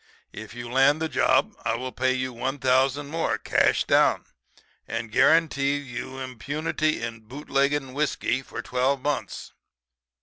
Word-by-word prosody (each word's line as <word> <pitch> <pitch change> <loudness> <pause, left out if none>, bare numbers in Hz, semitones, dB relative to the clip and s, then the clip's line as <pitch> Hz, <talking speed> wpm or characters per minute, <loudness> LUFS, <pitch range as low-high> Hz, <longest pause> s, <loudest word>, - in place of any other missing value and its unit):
If 110 +1 -9
you 120 0 -6
land 135 +5 +3
the 160 - -1
job - - +2
I - - 0
will 130 +2 -5
pay 130 +2 0
you 130 0 -3
$1,000 130 +2 +1
more, 165 +3 -1
cash - - +2
down, - - +3 0.6
and 115 -1 -4
guarantee 145 0 +3
you 130 -1 -7
impunity 145 +3 -2
in 115 -1 -5
boot 130 +7 -11
legging 140 -1 +1
whiskey 140 -3 -1
for 120 -2 -7
twelve 130 +3 0
months. 145 0 -3
130 Hz, 140 wpm, -25 LUFS, 125-145 Hz, 0.6 s, land